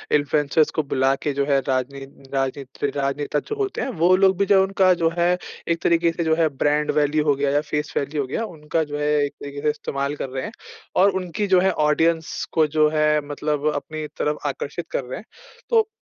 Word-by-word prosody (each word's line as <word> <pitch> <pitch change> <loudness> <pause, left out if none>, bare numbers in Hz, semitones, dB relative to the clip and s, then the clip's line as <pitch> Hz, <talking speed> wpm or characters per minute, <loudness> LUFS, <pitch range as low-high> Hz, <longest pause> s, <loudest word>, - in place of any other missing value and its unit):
Influencers 150 +1 +2
को 155 - +2
बुला 135 -1 +1
के 145 - 0
जो 140 0 0
है 140 -1 +3
राजनीत 135 +1 -4
राजनीत 135 0 -3
राजनेता 145 +1 -1
जो - - -2
होते 405 -2 -2
हैं, - - -2
वो 180 -3 +3
लोग 190 -1 +4
भी 200 - +2
जो 195 -1 +5
उनका 190 -1 +3
जो 165 - +5
है, 175 +1 +3 0.3
एक 170 0 0
तरीके 170 0 +3
से 165 +1 -3
जो 160 0 +2
है 165 -1 +3 0.2
ब्रांड 150 +1 +2
वैल्यू 150 +1 +1
हो 145 -2 +3
गया 140 0 0
या 145 - +2
फ़ेस 150 0 -3
वैल्यू 145 +1 -1
हो 135 - -4
गया 225 - -2
उनका 155 +1 -1
जो 145 -1 -5
है 150 0 -1 0.2
एक 145 - -6
तरीके 140 0 -6
से 150 - +2
इस्तेमाल 140 -1 -3
कर 135 - -5
रहे 130 0 -4
हैं - - -6 0.5
और 200 - +6
उनकी 195 +4 -3
जो 185 -2 +5
है 190 +1 +3 0.2
ऑडियंस 160 +1 +1
को 155 -2 +4
जो 155 0 +6
है 155 0 +3 0.2
मतलब 150 0 -1
अपनी 155 -1 -5
तरफ 150 0 0
आकर्षित 145 +4 -5
कर - - -1
रहे 125 +1 -6
हैं। - - -14 0.4
तो 450 -1 +3
150 Hz, 220 wpm, -22 LUFS, 140-170 Hz, 0.5 s, और